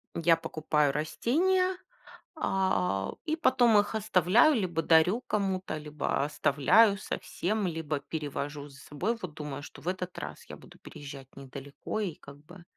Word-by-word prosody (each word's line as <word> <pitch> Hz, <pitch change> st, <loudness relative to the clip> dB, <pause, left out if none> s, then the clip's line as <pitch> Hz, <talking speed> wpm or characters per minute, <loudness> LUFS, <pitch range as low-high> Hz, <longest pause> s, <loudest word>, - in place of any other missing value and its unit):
Я 170 Hz, 0 st, +4 dB
покупаю 155 Hz, -3 st, 0 dB
растения, 360 Hz, -, +1 dB, 0.6 s
а, 100 Hz, -, 0 dB
и 315 Hz, 0 st, 0 dB
потом 245 Hz, -7 st, +4 dB
их 205 Hz, +2 st, -1 dB
оставляю, 215 Hz, -, +4 dB
либо 180 Hz, -7 st, 0 dB
дарю 165 Hz, +8 st, +4 dB
кому-то, 190 Hz, -7 st, -2 dB
либо 150 Hz, -2 st, -2 dB
оставляю 150 Hz, -, +4 dB
совсем, 205 Hz, +2 st, -3 dB
либо 160 Hz, -4 st, -2 dB
перевожу 145 Hz, -1 st, -5 dB
за 140 Hz, -, -15 dB
собой. 175 Hz, +12 st, -2 dB
Вот, 180 Hz, -4 st, -6 dB
думаю, 145 Hz, -2 st, -6 dB
что -, -, -11 dB
в -, -, -12 dB
этот 185 Hz, 0 st, -3 dB
раз 75 Hz, +1 st, -7 dB
я -, -, -8 dB
буду -, -, -17 dB
переезжать 140 Hz, -2 st, -10 dB
недалеко 140 Hz, +8 st, -6 dB
и 185 Hz, -7 st, -3 dB
как 140 Hz, 0 st, -13 dB
бы 175 Hz, +2 st, -13 dB
165 Hz, 145 wpm, -29 LUFS, 145-205 Hz, 0.6 s, Я